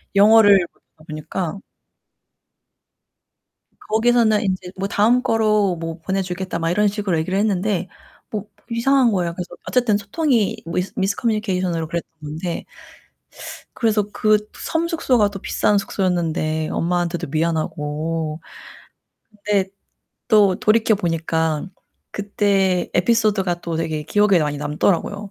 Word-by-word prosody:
영어를 205 -3 +6
못하다 155 -1 -25
보니까 160 +4 -4 2.2
거기서는 225 -1 +2
인제 185 -2 -2
뭐 195 +1 -2
"다음 220 +5 +3
거로 215 -5 +2
뭐 165 0 -5
보내 190 +4 -1
주겠다." 180 -1 -4
막 165 0 0
이런 210 +4 +2
식으로 200 -4 -1
얘기를 185 +4 -1
했는데 200 -2 0 0.4
뭐 215 -2 -4 0.2
이상한 245 +1 +3
거예요. 175 -4 -1
그래서 175 0 -6 0.2
어쨌든 240 -5 +2
소통이 225 +1 0
미스 180 +3 -3
미스 195 +1 0
커뮤니케이션으로 185 -7 -1
그랬던 170 +1 -4
건데 160 +4 -4 1.1
그래서 220 -3 +2
그 215 0 +3 0.2
섬 330 +1 -2
숙소가 255 - +2
또 200 -1 -8
비싼 205 +2 +1
숙소였는데 165 -5 -1
엄마한테도 175 0 -1
미안하고 155 0 -2 1.0
근데 200 -2 +1 0.6
또 205 -4 +5
돌이켜 220 +1 +3
보니까 160 -4 -1 0.5
그때 200 -3 0
에피소드가 195 -3 +2
또 170 -1 -3
되게 160 -2 -2
기억에 205 +2 +3
많이 150 -1 -1
남더라고요. 175 +7 -1
190 Hz, 295 characters per minute, -21 LUFS, 165-210 Hz, 2.2 s, 영어를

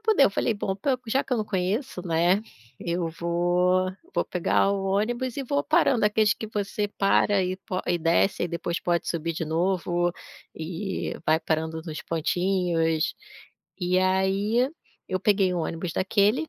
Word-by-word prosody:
poder, 435 -10 +4
eu - - +4
falei: 225 - 0
"Bom, 195 -2 -2 0.3
já 265 +5 +1
que 260 - -6
eu - - +3
não 215 - -1
conheço, 195 +2 -2
né, 175 +3 +3 0.4
eu 170 0 -1
vou 175 +2 +2 0.2
vou - - +1
pegar 180 +2 +1
o 195 - -2
ônibus 235 +6 -1
e 275 - -3
vou 285 +3 0
parando", 310 -7 +3
aqueles 210 0 +3
que 220 - -7
você 205 0 -2
para, 200 0 +2
e 185 0 -1
po 185 -1 -4
e 175 - +2
desce, 170 +4 +2
e - - +3
aí - - -3
depois 170 0 -3
pode 175 -1 0
subir 165 0 -2
de 165 0 -3
novo, 175 +1 0 0.4
e 175 +5 -4
vai 155 +1 +3
parando 160 0 -2
nos 155 -3 -6
pontinhos. 165 -1 0 0.7
E 180 +1 +2
aí, 195 +6 +2 0.4
eu 185 0 -1
peguei 195 -3 +3
um 175 - -1
ônibus 165 +1 -3
daquele, 205 +9 +2
185 Hz, 165 wpm, -26 LUFS, 170-210 Hz, 0.7 s, poder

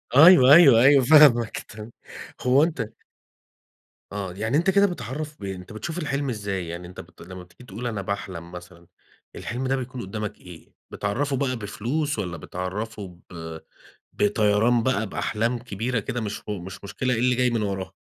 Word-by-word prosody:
أيوه، 145 -3 +8
أيوه، 135 -9 +8
أيوه، 135 0 +6
فاهمك 130 -6 +6
تم 105 +1 -11 0.6
هو 130 +3 +5
أنت 160 -6 -1 1.3
آه، 100 -3 -5
يعني 110 +8 -1
أنت 175 +4 +2
كده 200 +1 +4
بتعرّف 150 - -5
ب - - -11
أنت 95 +2 -7
بتشوف 130 - -6
الحِلم 145 -4 -2
إزاي؟ 100 -6 -4
يعني 85 +1 -7
أنت 90 - -12
بت 85 +2 -19
لمّا 90 +1 -10
بتيجي 90 +6 -18
تقول 120 +1 -6
أنا 105 -4 -3
باحلم 95 -4 -5
مثلًا، 90 -1 -12 0.5
الحِلم 130 +2 -4
ده 135 - +1
بيكون 130 -1 -5
قدامك 105 +2 -5
إيه؟ 90 -3 -14 0.2
بتعرّفه 135 +8 -2
بقى 130 -2 -1
بفلوس 125 +7 -3
والّا 85 -3 -4
بتعرّفه 95 +2 -6
ب 80 -2 -8 0.5
بطيران 105 +3 +2
بقى 110 -4 0
بأحلام 115 +5 -1
كبيرة 115 +1 -3
كده 120 +3 -4
مش 105 -1 -5
هو 105 -3 -3
مش 95 +3 -10
مشكلة 125 +6 -2
إيه 115 - -1
اللي 125 0 +2
جاي 125 0 +2
من 115 -2 -1
وراها؟ 95 -2 -3
110 Hz, 170 wpm, -24 LUFS, 95-130 Hz, 1.3 s, أيوه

